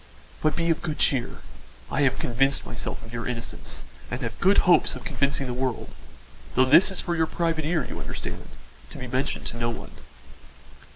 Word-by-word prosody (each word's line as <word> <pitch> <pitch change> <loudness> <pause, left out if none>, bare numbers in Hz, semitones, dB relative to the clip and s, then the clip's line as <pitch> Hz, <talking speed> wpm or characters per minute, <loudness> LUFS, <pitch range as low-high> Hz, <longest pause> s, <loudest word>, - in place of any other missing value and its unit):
"But 155 0 +2
be 170 0 +2
of 165 - 0
good 155 -3 -3
cheer; 135 -4 +1 0.5
I 150 - +1
have 135 -2 +3
convinced 135 +3 +1
myself - - -4
of 115 - -12
your 115 0 -3
innocence 115 - -4 0.3
and - - -4
have - - -4
good 195 +2 +5
hopes 180 -1 +5
of - - -8
convincing 140 -3 0
the 125 - -3
world 125 -2 -2 0.6
though 130 - +6
this 150 +10 +7
is 190 - -2
for 170 - -1
your 160 -1 +2
private 165 -2 0
ear, 160 -1 +1
you - - -6
understand, - - -6 0.4
to - - -10
be 130 - -5
mentioned 130 +3 -1
to 120 - -3
no 120 0 0
one." 115 - -6
140 Hz, 190 wpm, -26 LUFS, 125-160 Hz, 0.6 s, this